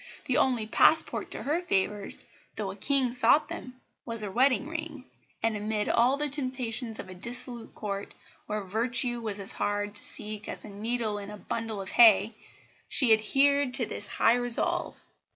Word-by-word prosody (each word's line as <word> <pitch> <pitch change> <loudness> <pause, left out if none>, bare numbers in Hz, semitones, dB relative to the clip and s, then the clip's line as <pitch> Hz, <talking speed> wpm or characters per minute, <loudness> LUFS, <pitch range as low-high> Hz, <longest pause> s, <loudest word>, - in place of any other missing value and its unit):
The 265 -3 +2
only 245 -5 +2
passport 310 +8 +2
to - - -4
her 310 +5 0
favours, 205 - -1 0.3
though 200 -3 -3
a - - -9
King 265 +3 +1
sought 250 +5 +3
them, 255 0 -8 0.2
was 230 -2 -5
a 200 - -4
wedding 265 +4 +2
ring; 315 -4 -6 0.4
and 225 -1 +1
amid 210 0 -2
all 250 +4 +3
the 295 +1 -1
temptations 255 -5 -2
of - - -8
a 185 - -9
dissolute 240 +4 -4
Court, 200 -1 -5 0.3
where 210 -1 -3
virtue 235 +4 0
was 210 -3 -5
as 195 - -5
hard 205 0 -2
to 205 - -1
seek 210 0 -2
as - - -6
a - - -9
needle 215 +1 -2
in 200 0 -8
a 210 - -7
a - - -12
bundle 225 0 -4
of 190 -1 -6
hay, 225 -2 +6 0.6
she 240 -5 +5
adhered 270 +4 +3
to 255 -4 +2
this 205 - -3
high 225 - +3
resolve. 245 -1 +1
230 Hz, 180 wpm, -28 LUFS, 210-255 Hz, 0.6 s, hay